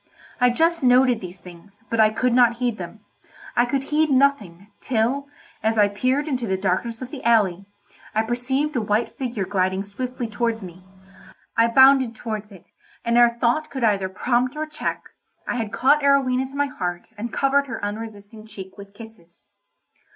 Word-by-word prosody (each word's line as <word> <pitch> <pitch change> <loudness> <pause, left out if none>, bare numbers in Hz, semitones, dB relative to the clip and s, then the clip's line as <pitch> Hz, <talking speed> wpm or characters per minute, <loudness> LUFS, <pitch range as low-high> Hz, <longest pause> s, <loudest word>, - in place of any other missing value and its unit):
I 250 -1 +5
just 330 +7 +1
noted 250 -2 +4
these 180 0 -8
things, 185 +4 -16
but 230 - 0
I 215 -1 +6
could 245 +3 0
not 240 -1 +5
heed 240 -3 -2
them. 180 +4 -8 0.5
I 240 - +4
could 270 +2 -1
heed 310 +1 +3
nothing, 220 -9 +1
till, 255 +4 -1 0.3
as 220 +1 0
I 205 -1 +5
peered 255 +8 0
into 255 -5 -2
the 190 -1 0
darkness 205 +6 -2
of 255 - -9
the 285 - -8
alley, 200 -5 +2 0.5
I 220 - +2
perceived 265 +6 -1
a 245 - +1
white 215 +2 0
figure 240 -7 -4
gliding 190 0 0
swiftly 245 +4 -5
towards 225 0 -2
me. 180 0 -11 0.7
I 230 0 +4
bounded 265 -1 +5
towards 215 -2 -6
it, 185 -3 -15 0.4
and 235 0 +1
ere 240 0 +7
thought 250 +7 +1
could 265 -3 -5
either 200 -4 +2
prompt 245 +7 0
or 310 +1 -2
check, 305 - -4 0.4
I - - -2
had 220 -3 -3
caught 275 +7 +3
Arowhena 265 -2 +2
to 275 - -13
my 285 0 +1
heart 180 -8 -5
and 220 +2 -5
covered 280 +1 +1
her 235 - -5
unresisting 215 0 -8
cheek 195 -2 -11
with 200 0 -12
kisses. 205 -4 -15
230 Hz, 180 wpm, -23 LUFS, 205-260 Hz, 0.7 s, ere